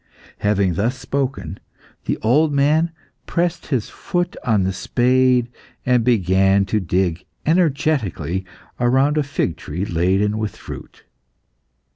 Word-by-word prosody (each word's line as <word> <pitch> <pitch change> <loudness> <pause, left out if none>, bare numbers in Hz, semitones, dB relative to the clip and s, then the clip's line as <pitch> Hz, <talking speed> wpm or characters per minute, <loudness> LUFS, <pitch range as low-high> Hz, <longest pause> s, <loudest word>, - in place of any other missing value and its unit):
'" - - -22
Having 100 -3 +2
thus 115 +9 0
spoken, 135 - -3 0.5
the - - -1
old 150 +8 +3
man 150 +4 +3 0.4
pressed 175 0 -1
his 130 -7 -1
foot 175 0 -2
on 110 -6 +2
the 95 +1 0
spade, 125 +3 +2 0.4
and 125 -2 +3
began 95 -3 +3
to 105 +3 0
dig 90 -2 0 0.2
energetically 140 - +1 0.4
round 135 +5 +3
a - - +3
fig 135 - -2
tree 90 +9 -4
laden 95 +5 +1
with 110 -2 -3
fruit. - - -10
120 Hz, 125 wpm, -20 LUFS, 95-140 Hz, 0.5 s, old